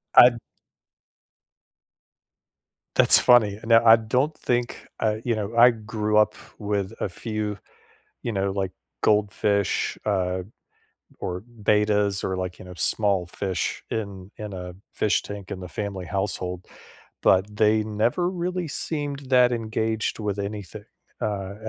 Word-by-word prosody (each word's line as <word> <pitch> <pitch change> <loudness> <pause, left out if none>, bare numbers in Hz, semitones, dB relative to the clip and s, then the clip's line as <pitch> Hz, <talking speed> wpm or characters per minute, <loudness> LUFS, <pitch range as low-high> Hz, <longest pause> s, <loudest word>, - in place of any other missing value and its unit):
I 125 - +10
d 120 - -9 2.6
That's - - +7
funny. 110 -5 +4
Now, 115 0 +5
I 115 - +10
don't 125 +7 0
think 120 -1 -2
uh, 110 -1 +1
you 120 -2 0
know, 105 +1 -4
I 120 +1 +8
grew 110 -1 -2
up 105 - +4 0.2
with 100 -1 -2
a - - -1
few, 105 +2 -4 0.7
you 120 - -2
know, 100 -1 0
like, 95 -1 -2 0.3
goldfish, 105 -1 +1
uh, 95 -3 0 0.8
or 90 +1 -4 0.2
betas 105 -1 +2
or, 95 - -1
like, 90 -1 -4
you - - -11
know, 90 0 -10
small 100 0 +1
fish 95 0 -3
in 100 -3 -5
in 105 -1 -7
a 90 -1 -7 0.2
fish 105 - +1
tank 100 -2 -8
in 95 - -5
the 90 - -7
family 95 +2 -4
household, 90 -2 -3 0.6
but 95 +2 +3
they 110 0 +3
never 110 +11 0
really 180 -1 -3
seemed 145 -1 -3
that 125 -1 +5
engaged 110 -2 -2
with 105 -2 -2
anything. 100 0 -6 0.4
Uh, - - +1
uh, 100 -2 -3
105 Hz, 140 wpm, -25 LUFS, 95-115 Hz, 2.6 s, I